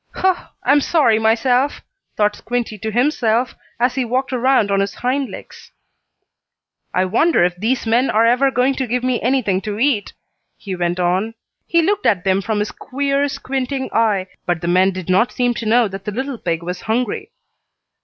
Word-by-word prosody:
"Hu! 375 0 +3 0.3
I'm 290 +1 +4
sorry 270 -9 +3
myself!" 245 +5 +2 0.4
thought 210 0 +2
Squinty 240 -1 -3
to 220 - -3
himself, 240 -1 +1 0.3
as 245 +1 +2
he 260 0 -1
walked 255 +3 -1
around 250 -4 +2
on 195 - +2
his 195 0 -1
hind 260 +2 -1
legs. - - -11 1.2
"I 185 - +1
wonder 235 - +3
if 175 0 +1
these 230 +8 -1
men 235 +4 +2
are 225 +2 +3
ever 250 +4 +3
going 260 +1 +1
to 260 - -1
give 245 +2 -1
me 255 -2 0
anything 230 -7 +1
to 210 -1 -4
eat," 235 -4 0 0.4
he 195 -3 -6
went 175 0 -1
on. 185 +6 0 0.3
He 335 -1 +3
looked 405 +4 +1
at 195 -4 +2
them 195 0 +2
from 215 +2 -2
his 210 0 -1
queer, 280 +1 -1
squinting 265 0 -3
eye, 215 -4 +2 0.2
but 175 -2 0
the 170 - -3
men 185 +2 +4
did 185 -2 -7
not 190 +6 +3
seem 245 -1 0
to 235 -2 -5
know 235 +1 +4
that 195 0 -8
the 210 - -3
little 260 +2 -4
pig 170 -1 -2
was 180 +1 -5
hungry. 245 - -2
230 Hz, 185 wpm, -19 LUFS, 200-260 Hz, 1.2 s, I'm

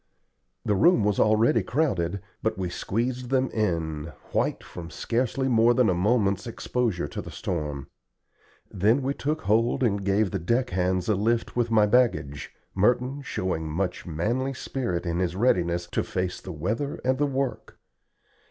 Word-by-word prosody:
The 105 - +2
room 115 - +4
was 105 -1 +1
already 110 +1 +4
crowded, 100 - 0 0.2
but - - -1
we 90 -2 -3
squeezed 120 +6 -2
them 130 -1 +1
in, 80 -8 -1 0.3
white - - 0
from 85 -2 -9
scarcely 125 +6 -1
more 120 -1 +4
than 125 -6 +4
a - - +2
moment's 100 +1 +1
exposure 115 -7 -1
to - - -5
the - - -9
storm. 75 -6 -4 0.9
Then 110 +8 +2
we 135 +2 0
took 155 +3 -2
hold 115 +5 +2
and 100 -4 +1
gave 100 +1 +2
the 95 - -1
deck 120 +9 0
hands 90 0 0
a 110 - +3
lift 115 +4 0
with 120 -1 +1
my 110 -2 +5
baggage, 105 - +1 0.2
Merton 125 +7 +1
showing 90 - -3
much 90 +4 -2
manly 120 - -1
spirit 95 -10 -3
in 85 0 -1
his 90 -1 -1
readiness 90 -6 +1
to - - +1
face 90 -1 -3
the 95 - -7
weather 105 - -2
and 130 +1 +2
the 145 - +3
work. 135 -1 -3
105 Hz, 160 wpm, -26 LUFS, 90-125 Hz, 0.9 s, my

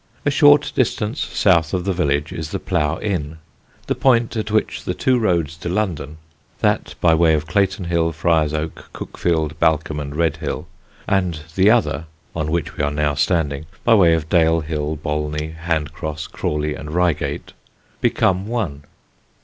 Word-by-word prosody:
A 145 - +3
short 145 0 +5
distance 115 0 0
south 85 -3 +2
of 90 -1 -2
the 100 - +1
village 75 -4 0
is 80 -2 -5
the - - -2
Plough 75 +2 0
Inn, 80 -7 -2 0.5
the - - 0
point 120 -3 +2
at 110 -1 -2
which 110 0 0
the 90 - -3
two 125 +6 +2
roads 85 -7 0
to 85 - -5
London 85 -6 -2 0.4
that - - 0
by 85 -2 +4
way 80 -1 +4
of 75 0 -2
Clayton 95 +2 0
Hill, 85 -1 +1
Friar's 80 -1 +1
Oak, 75 +1 -5
Cuckfield, 80 -3 -2
Balcombe 80 -2 +1
and 70 -1 -6
Redhill, 80 -2 -1 0.4
and 90 -5 0
the 95 +4 +4
other 115 -7 +2 0.3
(on 75 -2 -2
which 85 +1 -2
we - - -1
are 70 - +2
now 75 0 0
standing) 75 -1 0 0.2
by 115 - +5
way 90 -6 +6
of 80 -1 -3
Dale 80 -1 +3
Hill, 75 0 -3
Bolney, 75 +1 -3
Hand 80 -2 -2
Cross, 80 -2 -5
Crawley 75 0 -2
and 75 +2 -7
Reigate 90 -4 -1 0.5
become 95 +1 +1
one. 100 -12 -2
80 Hz, 165 wpm, -20 LUFS, 75-95 Hz, 0.5 s, way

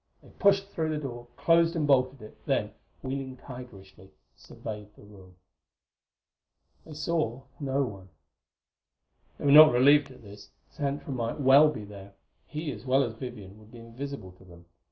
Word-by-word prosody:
They - - -17
pushed 195 -1 +2
through 160 -4 -2
the 155 - -2
door, 120 -5 -7
closed 170 0 +3
and 155 -3 0
bolted 130 -3 +2
it, 110 - -12
then, - - 0 0.3
wheeling 130 -1 -5
tigerishly, 100 -8 -12 0.3
surveyed 105 -1 -9
the - - -17
room. 95 -3 -16 1.5
They 155 - -10
saw 155 -5 -2 0.2
no 140 -1 0
one. 100 -6 -8 1.3
They - - -7
were 140 - +4
not 155 +1 +10
relieved 140 +3 +5
at 130 -2 -15
this. 100 0 -13 0.2
Xantra 145 -1 -4
might 115 +2 -3
well 140 +3 +6
be 125 -8 -6
there; 100 -1 -12 0.3
he, 155 0 -5
as 110 -3 -9
well 135 +1 +3
as 115 -3 -4
Vivian, 110 -4 -9
would 110 0 -18
be 120 - -12
invisible 115 -2 -8
to - - -17
them. 85 -2 -16
130 Hz, 160 wpm, -28 LUFS, 105-145 Hz, 1.5 s, not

